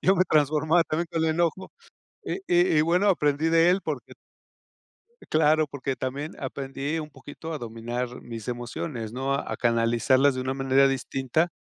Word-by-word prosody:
yo 190 +1 +4
me 185 - +4
transformaba 155 +2 +3
también 160 +4 -2
con 165 -1 0
el 160 - +2
enojo 170 +3 -1 0.5
y - - -2
y 175 -2 +3
y, - - +6
bueno, 180 +5 +2
aprendí 150 -3 +2
de 165 +1 +5
él 190 - +2
porque - - -5 1.2
claro, 155 0 +3
porque 135 -2 -4
también 135 +5 -4
aprendí 135 +3 -4
un 155 -1 -5
poquito 145 +3 -9
a 150 - -4
dominar 120 +2 -5
mis 115 -1 -8
emociones, 120 -1 -5
¿no?, 135 +2 -1
a - - -3
canalizarlas 120 +3 +3
de 130 - -3
una 130 +1 -2
manera 135 0 +3
distinta. 135 +4 -1
140 Hz, 165 wpm, -26 LUFS, 130-160 Hz, 1.2 s, y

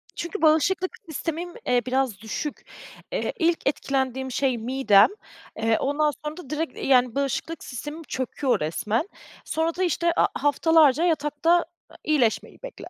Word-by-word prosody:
Çünkü 345 +5 -5
bağışıklık 330 +4 +2
sistemim, 330 +3 -4
eee, 245 -1 +3
biraz 255 -5 0
düşük. 250 +7 -5 0.5
Eee, - - -2
ilk 335 -3 +1
etkilendiğim 265 -2 -1
şey 255 -1 0
midem, 235 -3 +4 0.5
eee, 225 0 +2
ondan 295 +2 +1
sonra 300 +3 -4
da 290 -7 -10
direkt, 310 +1 -3
yani, 250 -3 +3
bağışıklık 280 +4 -2
sistemim 295 +6 -7
çöküyor 260 -1 -1
resmen. 210 - -1 0.4
Sonra 320 +1 -1
da 370 - -1
işte, 340 0 +1
aaa, - - +5
haftalarca 295 +1 +4
yatakta, 325 +1 +2 0.4
iyileşmeyi 275 -8 0
bekle. - - -9
290 Hz, 135 wpm, -25 LUFS, 255-330 Hz, 0.5 s, aaa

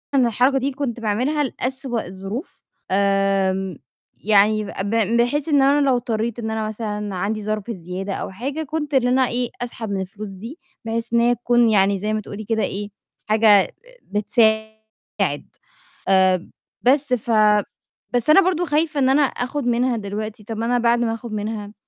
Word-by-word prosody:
الحركة 250 +2 +3
دي 265 - -1
اللي 275 -2 -2
كُنت 245 -5 -3
باعملها 250 +8 0
لأسوأ 260 -2 -3
الظروف، 195 - -7 0.3
آمم 195 -2 +1 0.5
يعني 215 +1 +4
ب - - -7
ب 225 +2 +1
بحيث 285 +5 0
إن 285 -2 +4
أنا 285 +2 +4
لو 255 - +4
اضطريت 235 -1 -2
إن 220 -1 -3
أنا 220 -1 -2
مثلًا 210 -2 -4
عَندي 210 +3 -2
ظرف 215 +1 -3
زيادة 185 +1 -5
أو - - -4
حاجة 275 +10 -4
كنت 300 0 -4
إن 250 -2 +3
أنا 255 0 +3
إيه، 245 0 -1
أسحب 235 -3 -5
من 195 -1 -1
الفلوس 200 +2 -7
دي، 230 - -9 0.3
بحيث 230 +1 -3
إن 235 - +4
هي 240 +1 +3
تكون 240 0 +3
يعني 200 -1 +3
زي 215 +2 -2
ما 215 - -1
تقولي 210 +1 -8
كده 220 0 0
إيه، 205 +1 -3 0.4
حاجة 215 -3 +4 0.3
بتساعد، 220 +1 -1 0.6
آآ 185 -2 +3 0.3
بس 265 +1 +2
ف 235 -1 -1 0.8
بس 245 +4 0
أنا 390 +6 +8
برضه 355 -1 +1
خايفة 305 0 0
إن 260 -1 +3
أنا 285 +2 +4
آخُد 270 +1 -2
منها 245 0 +1
دلوقتي، 210 +1 -5
طب 220 +1 -6
ما 225 - -2
أنا 245 +1 +2
بعد 235 0 +3
ما 230 -1 0
آخُد 230 0 -7
منها 210 0 -4
225 Hz, 175 wpm, -21 LUFS, 205-250 Hz, 0.8 s, أنا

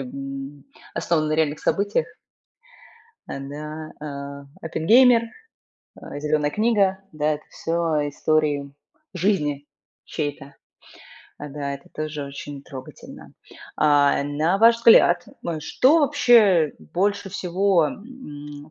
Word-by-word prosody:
м, 135 +2 -7 0.3
основаны 155 -3 0
на - - -1
реальных 155 -1 0
событиях. 205 - 0 1.2
Э, - - -6
да, 150 +3 -7
э. 140 -1 -7 0.2
Это: 160 0 -4
"Геймер", 235 +7 +6 0.8
э, - - -8
"Зелёная 150 0 0
книга". 205 -3 +2
Да, 155 0 0
это 150 - -8
всё 165 -2 -1
истории 145 -2 0 0.4
жизни 155 -7 0 0.4
чьей-то. 145 -2 -5 0.8
Э, 150 - -7
да, 140 -1 -4
это 140 - -13
тоже 155 -1 -4
очень 140 0 -8
трогательно. 130 -2 -11 0.4
А, 145 -2 +4
э, - - -2
на 155 +6 0
ваш 230 +2 +6
взгляд, 200 -7 +5 0.2
м, 165 -2 -3
что 265 - +3
вообще 230 - +4
больше 200 +2 -2
всего, 185 -2 +1
м, 150 - -10
155 Hz, 115 wpm, -23 LUFS, 145-190 Hz, 1.2 s, Геймер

